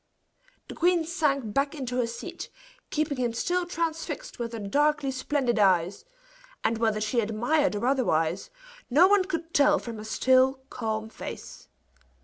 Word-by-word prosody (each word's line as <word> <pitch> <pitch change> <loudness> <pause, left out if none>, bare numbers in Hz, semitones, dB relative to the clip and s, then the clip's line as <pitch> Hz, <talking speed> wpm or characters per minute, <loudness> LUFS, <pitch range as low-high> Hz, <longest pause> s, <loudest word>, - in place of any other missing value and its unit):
The - - -7
queen 345 -1 +2
sank 280 - 0
back 280 +4 0
into 250 -4 -4
her 245 -2 +1
seat, 235 0 -7 0.4
keeping 300 -3 -1
him 240 -2 0
still 350 +8 -1
transfixed 335 - -4
with 235 -1 -3
her - - -4
darkly 285 +7 +1
splendid 260 -3 0
eyes; 185 - +2 0.6
and 225 0 0
whether 220 -2 +1
she 215 +3 0
admired 235 +6 +1
or 205 - -2
otherwise, 190 - +1 0.4
no 305 +9 +6
one 400 -1 +4
could 330 -2 -4
tell 295 +1 +5
from 230 -5 -7
her - - -7
still, 260 +4 +3
calm 220 -2 -3
face. - - -9
260 Hz, 150 wpm, -27 LUFS, 220-305 Hz, 0.6 s, no